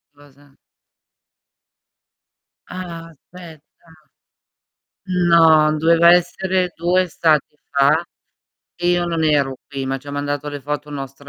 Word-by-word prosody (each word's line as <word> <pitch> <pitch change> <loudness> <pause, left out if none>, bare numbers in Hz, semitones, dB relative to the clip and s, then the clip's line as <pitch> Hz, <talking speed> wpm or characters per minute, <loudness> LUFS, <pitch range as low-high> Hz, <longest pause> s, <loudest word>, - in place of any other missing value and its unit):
Cosa? 145 -1 -22 2.1
Ah, 170 -2 -8
aspetta. 165 0 -15 1.7
No, 160 -2 +5
doveva 170 +2 +5
essere 180 +1 0
2 180 +2 +1
estati 160 -4 0
fa 145 +4 +2 0.7
e 175 0 -2
io 175 0 +1
non 165 -2 -2
ero 140 -3 +1
qui, 135 -2 -5
ma 135 0 -3
ci 145 - -21
ha - - -5
mandato 145 0 -4
le 145 -1 -7
foto 150 +2 -5
un 145 - -8
nostro 135 0 -9
155 Hz, 115 wpm, -19 LUFS, 145-170 Hz, 2.1 s, No